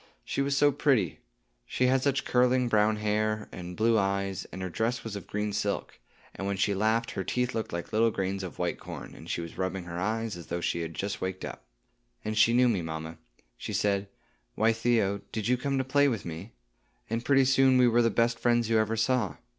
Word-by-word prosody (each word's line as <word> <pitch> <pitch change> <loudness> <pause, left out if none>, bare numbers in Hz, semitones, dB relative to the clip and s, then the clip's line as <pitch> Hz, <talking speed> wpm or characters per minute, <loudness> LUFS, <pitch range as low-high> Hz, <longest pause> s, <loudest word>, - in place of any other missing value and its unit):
She - - -1
was 140 0 0
so 145 +1 +5
pretty! 140 -4 +1 0.5
She 125 - 0
had 130 +1 +3
such 140 0 0
curling 125 0 +3
brown 110 -1 +3
hair, 105 0 -1
and 90 0 -8
blue 115 0 +3
eyes, 100 -1 -1
and 95 - -7
her - - -2
dress 115 +6 -1
was 115 -2 -5
of 100 - -7
green 105 0 -2
silk; - - -2 0.3
and 95 - -5
when 100 -1 -1
she 100 +1 +2
laughed, 110 +4 +1
her 95 - -3
teeth 125 +5 -1
looked 110 - -3
like 85 0 -5
little 115 +2 +4
grains 95 -2 -2
of 95 -3 -7
white - - -2
corn, - - -8
and - - -12
she - - -1
was 85 -1 -8
rubbing 95 0 -2
her 85 0 -6
eyes, 110 +2 -1
as 85 - -10
though 85 - -2
she 85 0 -1
had 80 -1 -5
just 100 +1 -3
waked 95 0 -3
up. - - -8 0.6
And 110 0 -2
she 110 +2 +5
knew 125 +1 +4
me, 105 -7 +1
mamma; 80 0 -6 0.4
she - - -5
said, 100 -1 0 0.5
'Why, 115 +1 +3
Theo, 110 -4 +1
did 110 -1 -2
you 125 - +4
come 135 +2 -1
to 130 - +1
play 145 +2 +3
with 115 -9 -2
me?' 85 +6 -7 0.5
and 115 +1 -2
pretty 135 0 +4
soon 135 0 +5
we 125 -1 +6
were 120 0 +4
the 115 - +3
best 115 +2 +1
friends 120 -1 +2
you 110 - +4
ever 110 +1 0
saw. 110 -7 +1
110 Hz, 225 wpm, -28 LUFS, 95-120 Hz, 0.6 s, we